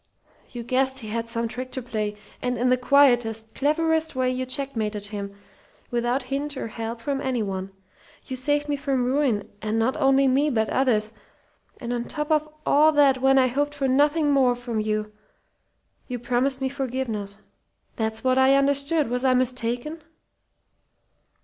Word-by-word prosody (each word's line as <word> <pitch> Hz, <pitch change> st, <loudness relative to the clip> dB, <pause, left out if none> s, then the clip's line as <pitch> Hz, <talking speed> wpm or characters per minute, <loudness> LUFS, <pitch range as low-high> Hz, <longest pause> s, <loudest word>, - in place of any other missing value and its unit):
You 240 Hz, -2 st, -7 dB
guessed 260 Hz, +2 st, 0 dB
he 215 Hz, -, -7 dB
had 230 Hz, +1 st, -3 dB
some 230 Hz, 0 st, -2 dB
trick 255 Hz, +2 st, -6 dB
to 260 Hz, -, -3 dB
play, 215 Hz, -3 st, -3 dB, 0.3 s
and 250 Hz, 0 st, -1 dB
in 250 Hz, +2 st, +1 dB
the 255 Hz, -, +5 dB
quietest, 240 Hz, -5 st, +3 dB
cleverest 320 Hz, +1 st, 0 dB
way 255 Hz, 0 st, +1 dB
you 255 Hz, 0 st, -3 dB
checkmated 225 Hz, -7 st, 0 dB
him, 200 Hz, -1 st, -6 dB, 0.6 s
without 240 Hz, +2 st, 0 dB
hint 280 Hz, +2 st, -3 dB
or 225 Hz, -, -4 dB
help 230 Hz, +1 st, -5 dB
from 275 Hz, +2 st, -2 dB
any 255 Hz, -4 st, -1 dB
one. 190 Hz, -1 st, -4 dB, 0.5 s
You 260 Hz, -, -5 dB
saved 290 Hz, +3 st, 0 dB
me 290 Hz, -, 0 dB
from 275 Hz, -3 st, -1 dB
ruin, 255 Hz, -5 st, +1 dB
and 215 Hz, +1 st, -1 dB
not 230 Hz, +4 st, +1 dB
only 270 Hz, -2 st, +4 dB
me, 275 Hz, +3 st, +2 dB
but 220 Hz, -5 st, 0 dB
others. 225 Hz, -5 st, +1 dB, 0.7 s
And 240 Hz, -1 st, -4 dB
on 240 Hz, -1 st, -2 dB
top 300 Hz, 0 st, -4 dB
of 305 Hz, 0 st, +2 dB, 0.2 s
all 305 Hz, +2 st, +5 dB
that, 275 Hz, -3 st, +4 dB
when 270 Hz, 0 st, +4 dB
I 260 Hz, -, +5 dB
hoped 290 Hz, +4 st, -1 dB
for 275 Hz, -2 st, -1 dB
nothing 290 Hz, +3 st, +3 dB
more 260 Hz, -3 st, +3 dB
from 240 Hz, -2 st, -4 dB
you, 215 Hz, 0 st, -2 dB, 1.0 s
you 250 Hz, -, -4 dB
promised 255 Hz, +3 st, 0 dB
me 265 Hz, -, 0 dB
forgiveness. 250 Hz, -7 st, -4 dB, 0.6 s
That's 220 Hz, -1 st, -3 dB
what 260 Hz, 0 st, +3 dB
I 265 Hz, +1 st, +5 dB
understood. 280 Hz, +2 st, +2 dB
Was 250 Hz, +2 st, -2 dB
I 260 Hz, -1 st, +4 dB
mistaken?" 250 Hz, +4 st, -1 dB
255 Hz, 170 wpm, -24 LUFS, 230-275 Hz, 1.0 s, the